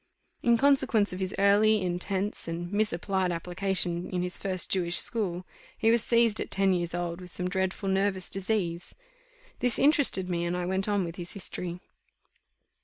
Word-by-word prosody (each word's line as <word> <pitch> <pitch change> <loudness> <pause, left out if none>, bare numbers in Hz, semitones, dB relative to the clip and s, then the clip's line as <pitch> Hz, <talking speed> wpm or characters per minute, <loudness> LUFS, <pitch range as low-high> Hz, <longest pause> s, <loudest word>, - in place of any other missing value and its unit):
In 235 -1 +3
consequence 265 -7 +3
of 180 - -6
his 190 0 -3
early, 210 +2 +4
intense, 185 +3 -2
and 175 +3 -5
misapplied 190 -2 0
application 180 0 -2
in 180 -1 -2
his 180 0 -2
first 185 -2 -2
Jewish 175 -2 +2
school, 185 -6 +2 0.3
he 225 -1 +3
was 230 -1 +3
seized 230 -2 +3
at - - -4
ten 195 -1 +2
years 175 -1 -2
old 175 0 -4
with 180 - -10
some 180 +1 -3
dreadful 190 +1 -2
nervous 190 -1 0
disease; 190 -3 -2 0.6
this 245 -2 +1
interested 280 -10 +3
me, 170 -1 -2
and 175 +1 -2
I 180 - -2
went 190 +3 0
on 205 -2 +1
with 170 0 -6
his 175 -1 -5
history. 180 -2 -6
190 Hz, 170 wpm, -28 LUFS, 175-205 Hz, 0.6 s, early